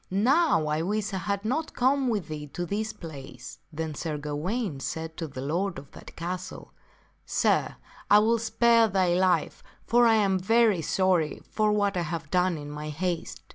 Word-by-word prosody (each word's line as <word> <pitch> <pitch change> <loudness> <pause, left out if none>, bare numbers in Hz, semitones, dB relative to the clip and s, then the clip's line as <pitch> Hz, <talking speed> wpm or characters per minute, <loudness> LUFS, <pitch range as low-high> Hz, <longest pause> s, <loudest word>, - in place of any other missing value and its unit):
Now 250 - +3
I 150 +1 0
wish 205 +3 -2
I - - -1
had 200 +3 -3
not 305 +8 -2
come 265 +1 +2
with 210 -8 -1
thee 150 -1 -6
to 175 - -3
this 215 +4 -2
place." 145 -6 -10
Then 160 0 -4
Sir 155 0 -4
Gawaine 150 - -3
said 160 +3 -5
to 165 - -4
the 130 -3 -7
lord 175 +8 -1
of 140 - -11
that - - -13
castle, 180 +2 -6 0.3
" - - -35 0.2
Sir, - - +1 0.3
I 205 - +8
will 225 +2 +3
spare 230 0 +4
thy 185 -3 +2
life, 185 0 +1 0.2
for 240 0 +4
I 225 - +5
am 195 -3 +2
very 220 -1 +3
sorry 180 -1 +1
for 215 -1 +2
what 205 -1 +1
I 180 - 0
have 165 -2 -5
done 180 -2 +2
in 145 -1 -7
my 150 +1 -6
haste." 170 +3 -3
185 Hz, 185 wpm, -27 LUFS, 160-215 Hz, 0.3 s, I